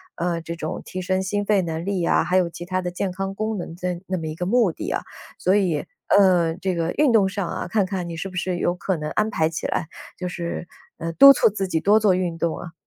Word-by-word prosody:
呃， 170 -1 -1
这 170 +1 -6
种 160 - -5
提 185 - -5
升 185 +1 0
心 205 +2 -1
肺 205 -2 +3
能 165 -2 -3
力 195 -3 -1
啊， - - +3
还 185 - +1
有 180 -2 +2
其 170 - -8
他 185 +1 -1
的 180 - -3
健 185 +2 -2
康 195 +1 -4
功 215 +1 -2
能 170 -2 -6
的 180 0 -3
那 185 - -1
么 165 - -5
一 155 - -5
个 180 - -3
目 225 -1 +3
的 - - -6
啊， - - -1 0.4
所 185 - +2
以， 180 -7 +1 0.2
呃， 180 -5 +4
这 190 -1 -1
个 165 0 -1
运 295 -3 +4
动 215 -4 +4
上 200 0 -3
啊， - - -4
看 200 +2 +1
看 185 -2 -4
你 170 - -5
是 180 +4 -4
不 185 - -12
是 180 0 -1
有 175 - +1
可 180 +1 -2
能 150 0 -4
安 215 +1 +1
排 160 -6 +1
起 165 - -4
来？ 160 - -2 0.3
就 180 - -4
是， 175 -1 -5 0.3
呃， 165 0 -4
督 275 +9 +10
促 - - +4
自 195 -2 -3
己 165 -3 0
多 210 +4 +5
做 205 -3 +4
运 180 -2 -2
动 165 -1 -1
啊。 175 - -8
180 Hz, 285 characters per minute, -23 LUFS, 170-195 Hz, 0.4 s, 督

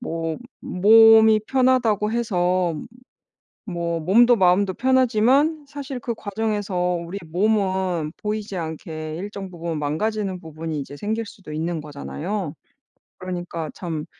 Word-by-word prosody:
뭐 165 -8 -3 0.2
몸이 220 +2 +6
편하다고 245 -5 +2
해서 180 -6 +1 0.9
뭐 170 -3 -2
몸도 235 +8 +5
마음도 190 +1 +3
편하지만 260 +4 +3
사실 275 -2 -6
그 240 -2 -3
과정에서 205 -2 -3 0.3
우리 185 +4 -6
몸은 185 -3 0
보이지 210 -2 -4
않게 160 -1 -5
일정 195 0 -6
부분 170 -2 -4
망가지는 190 +5 -2
부분이 160 -2 -5
이제 140 +1 -8
생길 220 +6 -2
수도 195 -7 -11
있는 160 +1 -2
거잖아요. 155 +4 -5 0.6
그러니까 175 -3 -5
참 160 -4 -5
190 Hz, 265 characters per minute, -23 LUFS, 165-220 Hz, 0.9 s, 몸이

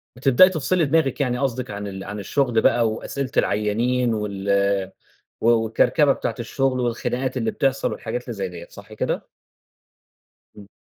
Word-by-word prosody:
بتبدئي 135 +8 +6
تفصِلي 170 0 0
دماغِك 150 -2 +1
يعني 125 -2 0
قصدِك 130 -2 -2
عن 100 0 -5
ال 95 -1 -7
عن 105 +1 -6
الشغل 120 +3 +1
بقى 115 -2 +3
وأسئلة 130 +4 -4
العيّانين 115 +4 +1
وال 100 -2 0 0.5
و 115 - +1
والكركبة 120 +6 +3
بتاعة - - -3
الشغل، 130 +2 -1
والخناقات 125 +2 -2
اللي 225 - 0
بتحصَل 135 -10 0
والحاجات 120 +2 -4
اللي 120 - -5
زي 100 -4 -3
ديّة، 85 -1 -9
صح - - -13
كده؟ - - -3 1.3
إمم. 100 -1 -13
120 Hz, 150 wpm, -22 LUFS, 105-135 Hz, 1.3 s, بتبدئي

